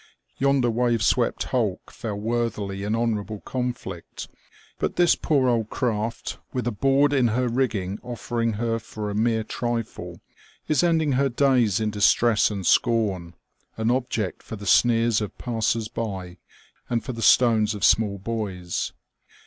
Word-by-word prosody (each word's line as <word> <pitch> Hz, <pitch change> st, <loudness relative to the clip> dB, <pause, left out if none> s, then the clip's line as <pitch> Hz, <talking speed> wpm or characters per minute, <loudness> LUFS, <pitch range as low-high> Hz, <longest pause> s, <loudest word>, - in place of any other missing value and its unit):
Yonder 135 Hz, -3 st, +2 dB
wave 120 Hz, -1 st, +1 dB
swept -, -, +1 dB
hulk -, -, -2 dB
fell 110 Hz, -3 st, -5 dB
worthily 105 Hz, -3 st, -2 dB
in 105 Hz, +2 st, -1 dB
honourable 110 Hz, -2 st, -2 dB
conflict; 120 Hz, -9 st, -5 dB, 0.5 s
but -, -, -1 dB
this 175 Hz, -1 st, +5 dB
poor 140 Hz, -4 st, +1 dB
old 115 Hz, -3 st, +1 dB
craft, 115 Hz, -3 st, -2 dB
with 125 Hz, -, -3 dB
a 120 Hz, -, 0 dB
board 135 Hz, +6 st, +2 dB
in 130 Hz, -4 st, +3 dB
her 125 Hz, +3 st, 0 dB
rigging 110 Hz, -6 st, -1 dB
oflFering 120 Hz, -2 st, -3 dB
her 115 Hz, +1 st, -1 dB
for 105 Hz, -1 st, -6 dB
a -, -, -4 dB
mere 110 Hz, +1 st, +1 dB
trifle, 120 Hz, 0 st, -4 dB, 0.5 s
is 155 Hz, -, +2 dB
ending 165 Hz, -4 st, +2 dB
her 135 Hz, +1 st, +2 dB
days 125 Hz, -6 st, +2 dB
in 110 Hz, -1 st, -1 dB
distress 110 Hz, +2 st, +3 dB
and 100 Hz, -3 st, -5 dB
scorn, 95 Hz, -8 st, +1 dB, 0.4 s
an 110 Hz, +1 st, +1 dB
object 120 Hz, -6 st, -2 dB
for -, -, -8 dB
the 100 Hz, -1 st, -9 dB
sneers 115 Hz, +2 st, +3 dB
of 105 Hz, -, -5 dB
passers 115 Hz, -2 st, -1 dB
by 95 Hz, -5 st, -5 dB, 0.5 s
and 120 Hz, -1 st, 0 dB
for 130 Hz, -, -5 dB
the 115 Hz, -, -6 dB
stones 110 Hz, -3 st, +4 dB
of 100 Hz, -, -6 dB
small 105 Hz, -3 st, +3 dB
boys. 95 Hz, -4 st, -3 dB
115 Hz, 150 wpm, -24 LUFS, 105-125 Hz, 0.5 s, this